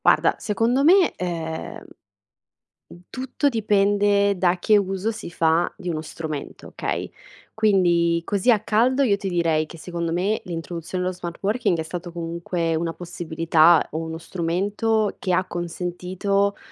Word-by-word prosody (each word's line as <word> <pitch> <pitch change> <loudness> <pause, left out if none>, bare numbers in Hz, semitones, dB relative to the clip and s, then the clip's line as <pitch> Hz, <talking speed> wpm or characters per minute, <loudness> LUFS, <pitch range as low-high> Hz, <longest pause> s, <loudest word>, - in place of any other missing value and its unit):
Guarda, - - +4
secondo 230 +6 +1
me 360 +3 +5
ehm 165 -3 -5 1.0
m - - -14
tutto 260 +3 -1
dipende 205 -3 +2
da 180 0 +2
che 215 - +4
uso 195 +1 0
si 220 -5 -7
fa 165 0 +1
di 180 - -7
uno 155 -2 -2
strumento, 155 -2 -7
okay, - - -4 0.4
quindi 175 -6 +3
così 200 +6 +2
a 215 - +2
caldo 240 +6 +2
io 215 -7 +3
ti 200 -1 -4
direi 165 -3 +1
che 165 - -12
secondo 170 0 -4
me 195 +6 0
l'introduzione 175 +1 -5
dello 185 0 -2
smart 170 -1 -7
working 210 -2 +1
è - - 0
stato 175 +2 -7
comunque 170 0 -2
una 165 +1 -2
possibilità 165 -1 +2
o 155 - -2
uno 160 0 -5
strumento 200 +6 -1
che 185 - -2
ha 185 +1 +2
consentito, 180 +3 -2
180 Hz, 145 wpm, -23 LUFS, 170-205 Hz, 1.0 s, me